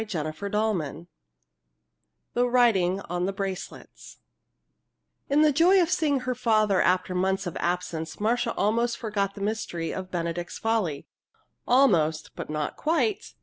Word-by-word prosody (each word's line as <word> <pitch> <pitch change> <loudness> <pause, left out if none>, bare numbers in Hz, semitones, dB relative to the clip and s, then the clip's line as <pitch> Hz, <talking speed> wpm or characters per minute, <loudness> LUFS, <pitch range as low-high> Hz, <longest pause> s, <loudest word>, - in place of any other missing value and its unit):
CHAPTER 165 -8 -3
XIV 200 -4 -2 1.3
THE 245 +1 +2
WRITING 200 -7 +3
ON 180 0 -2
THE 195 - -2
BRACELETS 195 -1 -7 1.1
In 290 +2 +4
the 305 - +5
joy 345 +7 +5
of 350 -1 +2
seeing 305 -7 +1
her 255 0 -1
father 215 -5 +2
after 185 +1 +1
months 190 +1 0
of 175 - -5
absence 170 -2 -3
Marcia 235 +3 0
almost 235 +3 +1
forgot 200 -3 -2
the 200 - -8
mystery 200 -6 -3
of 185 -1 -6
Benedict's 175 -1 -3
Folly. 210 -11 -1 0.6
Almost 175 - +3
but - - -6
not 150 -1 -3
quite! 335 +6 -1
200 Hz, 135 wpm, -26 LUFS, 175-240 Hz, 1.3 s, the